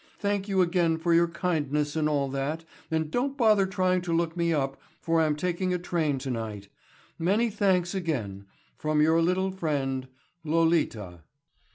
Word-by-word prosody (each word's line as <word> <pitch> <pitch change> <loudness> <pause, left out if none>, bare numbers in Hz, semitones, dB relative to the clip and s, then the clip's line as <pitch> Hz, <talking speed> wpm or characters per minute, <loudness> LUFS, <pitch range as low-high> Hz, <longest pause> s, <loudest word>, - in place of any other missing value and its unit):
Thank 200 -1 -1
you 190 -2 +3
again 170 -2 +1
for 170 +1 +1
your 170 +1 +5
kindness 150 -4 -1
and 155 -1 +1
all 140 -2 +1
that 140 +4 -3 0.2
and 160 -1 -1
don't 270 - -1
bother 215 -6 +4
trying 185 -1 +1
to 175 -1 -4
look 165 0 0
me 170 -1 +1
up 135 -3 -1 0.2
for 165 0 +1
I'm 155 -2 +2
taking 180 +3 -1
a - - +1
train 165 -5 -1
tonight. 110 -6 -5 0.5
Many 205 +7 +2
thanks 190 -3 +1
again—from 150 - -3
your 160 +2 +4
little 185 +3 +1
friend, 140 -7 -2 0.4
LOLITA. 155 - 0
165 Hz, 155 wpm, -27 LUFS, 145-180 Hz, 0.5 s, your